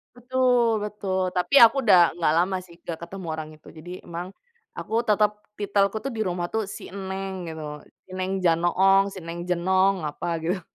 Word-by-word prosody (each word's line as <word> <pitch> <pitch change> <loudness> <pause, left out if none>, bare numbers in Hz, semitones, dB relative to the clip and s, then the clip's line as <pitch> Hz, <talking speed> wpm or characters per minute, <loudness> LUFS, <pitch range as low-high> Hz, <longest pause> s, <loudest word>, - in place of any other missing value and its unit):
Betul 245 -3 +2
betul, 190 -3 -2
tapi 180 +10 0
aku 230 +4 +7
udah 175 -4 +7
nggak 165 -3 +1
lama 185 +2 +2
sih, 175 -2 -15
nggak 165 -2 -5
ketemu 190 -1 -8
orang 155 -1 -5
itu. 155 - -21
Jadi 170 +3 -11
emang 175 +1 -6 0.5
aku - - -7
tetep 210 0 +3 0.3
titelku 200 0 +1
tuh 275 - -3
di 225 - -6
rumah 175 -1 -2
tuh 220 -1 0
si - - -9
Neng 190 -2 -5
gitu, 160 -1 -6 0.4
si 185 - -19
Neng 185 +1 -2
Janoong, 180 +3 +4
si 190 - -8
Neng 165 +1 -6
Jenong, 190 +2 +2
apa 145 - -6 0.2
gitu. 180 +3 -1
190 Hz, 180 wpm, -25 LUFS, 175-205 Hz, 0.5 s, aku